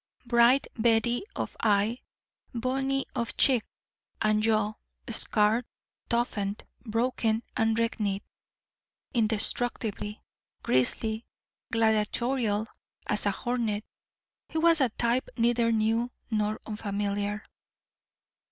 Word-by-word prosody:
Bright 240 +3 +5 0.2
beady 235 - +3
of - - -4
eye, 215 +2 +2 0.6
bony 270 +3 0
of 235 -1 -2
cheek 255 -4 +5 0.6
and 215 0 +2
jaw, 215 -1 +2 0.3
scarred, 220 +1 +2 0.4
toughened, 210 -4 -1 0.2
broken 225 -1 0
and 225 0 +2
reknit, 210 -4 0 0.9
indestructible, 220 -1 0 0.5
grisly, 220 - 0 0.4
gladiatorial 220 0 +1 0.4
as 210 0 +3
a - - +3
hornet, 220 -1 -2 0.6
he - - -4
was 330 -1 +5
a 260 - +4
type 235 +3 0
neither 235 0 +3
new 225 +2 +1 0.2
nor 215 0 0
unfamiliar. 205 -1 -2
225 Hz, 90 wpm, -28 LUFS, 210-240 Hz, 0.9 s, Bright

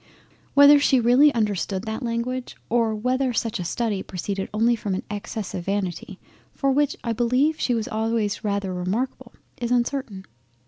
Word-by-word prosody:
Whether 285 +1 +8
she 270 -2 +3
really 250 +5 +5
understood 205 -3 -1
that 220 +1 -4
language 245 +1 -3
or 230 -2 +1
whether 255 +3 0
such 225 -3 -1
a - - -2
study 205 +2 -1
proceeded 195 +2 -4
only 230 +3 +2
from 205 -4 -3
an - - -4
excess 205 -1 -5
of 175 - -5
vanity 195 -1 -3 0.3
for 275 -1 0
which 290 +1 +1
I 230 - -1
beleive 255 +7 +1
she 245 - +1
was 225 -2 -2
always 220 -1 -1
rather 200 -2 -1
remarkable, 235 +8 -3 0.2
is 240 -1 -3
uncertain. 240 -5 -1
230 Hz, 165 wpm, -24 LUFS, 200-250 Hz, 0.3 s, Whether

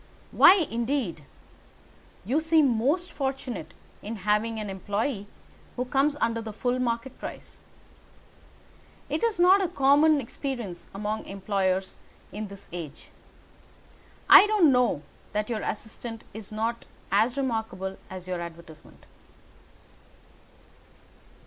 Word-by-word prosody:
"Why, 360 - +8
indeed? 235 - -2 1.0
You 260 +9 +1
seem 315 -6 +3
most 305 +11 0
fortunate 265 - -4 0.3
in 220 +3 -5
having 210 +2 0
an 210 - -4
employé 205 +3 -3 0.5
who 250 - -2
comes 280 +3 +1
under 230 0 0
the 220 -1 -6
full 245 +4 -1
market 240 +1 -2
price. - - -9 1.5
It - - -2
is 455 -6 +1
not 370 +3 +6
a 380 - +1
common 295 -1 +4
experience 235 -8 -5
among 210 +2 -3
employers 190 -1 -1 0.3
in 210 +1 -5
this 200 0 -10
age. 160 -5 -8 1.2
I 415 - +10
don't 410 -9 +5
know 250 - +2 0.3
that 210 +2 -1
your 220 -2 -2
assistant 225 +1 -5
is 215 -1 -8
not 225 +2 -2 0.3
as 220 +6 +2
remarkable 220 -7 -2
as 185 -1 -8
your 180 -1 -3
advertisement." 170 -2 -11
230 Hz, 115 wpm, -27 LUFS, 200-275 Hz, 1.5 s, I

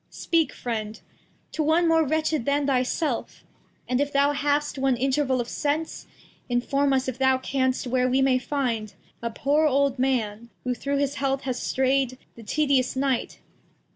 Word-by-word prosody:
Speak, 325 -5 0
Friend, 220 -3 -4 0.5
to - - -2
one 320 +3 +3
more 325 0 +4
wretched 310 -2 0
than 285 0 +1
thy 265 -2 +2
self; 255 0 -3 0.4
And 250 +2 +1
if 285 0 -1
thou 280 +1 +3
hast 290 0 0
one 265 -2 +2
Interval 265 0 +1
of 240 - -2
Sense, 300 +4 -2 0.4
Inform 275 +3 +1
us, 265 -1 +1
if 260 -1 -4
thou 265 0 +4
canst, 260 0 -1
where 255 0 +1
we 260 +1 +2
may 260 -1 +3
find 245 -6 -2 0.3
A 235 - -2
poor 290 +7 +2
old 275 -2 +1
Man, 235 -4 -1
who 250 - -1
through 280 +4 -2
this 285 0 -1
heath 270 0 0
has 255 -2 -3
stray'd 265 -1 +1 0.2
The 235 - -13
tedious 265 +2 +1
Night. 265 -2 -1
270 Hz, 170 wpm, -25 LUFS, 250-285 Hz, 0.5 s, more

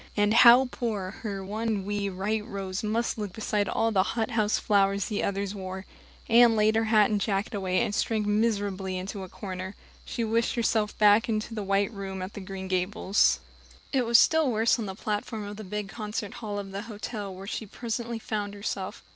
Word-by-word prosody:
And 205 +1 +3
how 240 +3 +8
poor 205 -6 -3
her 200 -4 -4
one 215 -1 -2
wee 205 0 -1
white 205 +3 -2
rose 195 -3 -4
must 225 +1 -1
look 205 -3 -4
beside 210 -2 -1
all 225 0 +1
the 195 -3 +4 0.2
hothouse 220 -2 +1
flowers 200 -1 +2
the 210 -3 -2
others 200 0 -1
wore! 190 -1 -6 0.4
Anne 235 0 +6
laid 215 0 +3
her 225 0 +2
hat 215 -1 +4
and 205 -1 +1
jacket 200 0 -1
away, 185 -2 0
and 205 - -1
shrank 215 0 0
miserably 205 -3 0
into 195 +2 -5
a 190 - -7
corner. 190 0 -6 0.3
She 235 - -3
wished 230 +1 +1
herself 220 -3 0
back 210 +2 +5
in 215 -1 +1
the 220 -2 -4
white 200 +2 +1
room 195 -2 -5
at 185 - -7
Green 190 -1 -6
Gables. 185 +2 +2 0.5
It 255 -3 +2
was 235 0 +7
still 320 +1 +4
worse 225 +2 +2
on 215 - -3
the 190 - -5
platform 210 +1 -3
of 205 0 -7
the 215 - -7
big 210 +1 -4
concert 210 -1 -5
hall 210 -2 -4
of 200 -1 -5
the 195 +1 -4
hotel, 210 -1 -5
where 190 +1 -9
she 215 +1 -4
presently 235 +2 -4
found 205 -2 -4
herself. 200 0 -4
210 Hz, 195 wpm, -27 LUFS, 195-225 Hz, 0.5 s, how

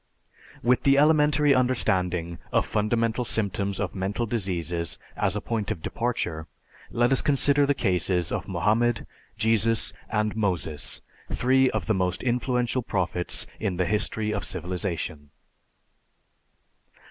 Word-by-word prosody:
With 125 +1 +3
the 140 0 +4
elementary 150 -1 +4
understanding 90 -10 0
of - - +2
fundamental 115 +3 0
symptoms 100 -3 -2
of - - -2
mental 100 +5 -2
diseases 90 -6 -1 0.2
as - - 0
a - - -2
point 110 -4 -2
of 80 - -4
departure, 85 -10 -2 0.4
let 120 +2 +2
us 135 - +3
consider 145 0 +3
the 145 - +2
cases 90 - 0
of - - -3
Mohammed, 115 +3 +1 0.3
Jesus, 115 0 +2 0.2
and 105 -1 0
Moses, 90 -8 -2 0.3
three 130 +1 +3
of - - -2
the 110 - +2
most 90 -2 -1
influential 125 0 0
prophets 90 -5 -1
in 95 -5 -2
the 90 - +1
history 105 +2 -1
of - - -2
civilization. 85 -4 -3
110 Hz, 125 wpm, -26 LUFS, 90-125 Hz, 0.4 s, the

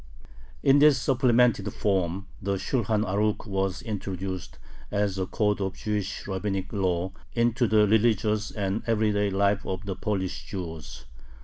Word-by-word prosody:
In 140 +1 +6
this 150 -2 +6
supplemented 120 -5 +3
form 95 -3 -1 0.2
the 100 0 0
Shulhan 110 +1 0
Arukh 105 +3 0
was 95 -2 -2
introduced, 95 - -5 0.3
as 100 -2 0
a 95 - -1
code 105 0 0
of 95 -1 -2
Jewish 105 -2 -3
rabbinic 95 0 -3
law, 95 -2 0 0.2
into 120 +1 +2
the 105 -1 +4
religious 110 -1 +2
and 100 0 -2
everyday 105 -2 +2
life 100 +1 +1
of 95 +1 -4
the 95 -2 -3
Polish 95 -3 -2
Jews. 80 -5 -7
100 Hz, 135 wpm, -27 LUFS, 95-110 Hz, 0.3 s, In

